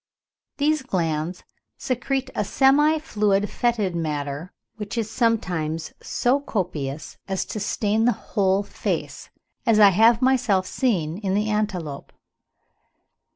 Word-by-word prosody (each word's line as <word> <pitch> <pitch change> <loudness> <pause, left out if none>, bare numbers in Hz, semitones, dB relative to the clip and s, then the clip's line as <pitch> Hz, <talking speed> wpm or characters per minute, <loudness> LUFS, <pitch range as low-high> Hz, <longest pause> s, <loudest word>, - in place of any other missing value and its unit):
These 300 +1 +2
glands 170 -7 -2 0.3
secrete 265 +1 -2
a - - 0
semi 290 +8 +4
fluid 210 -8 0
fetid 220 -7 0
matter 150 0 -3 0.3
which 210 +1 -6
is 220 -1 -2
sometimes 175 -10 -1
so 255 +3 +1
copious 160 - -4
as 190 -1 -2
to 215 - -5
stain 210 +2 0
the 245 - +5 0.2
whole 195 -2 +2
face, - - -4 0.3
as 225 -3 +3
I 205 -1 +9
have 225 +4 +5
myself 245 -7 +2
seen 185 -9 -1
in 195 -3 -2
an 210 - +2
antelope. 195 -9 -3
210 Hz, 120 wpm, -23 LUFS, 175-240 Hz, 0.3 s, I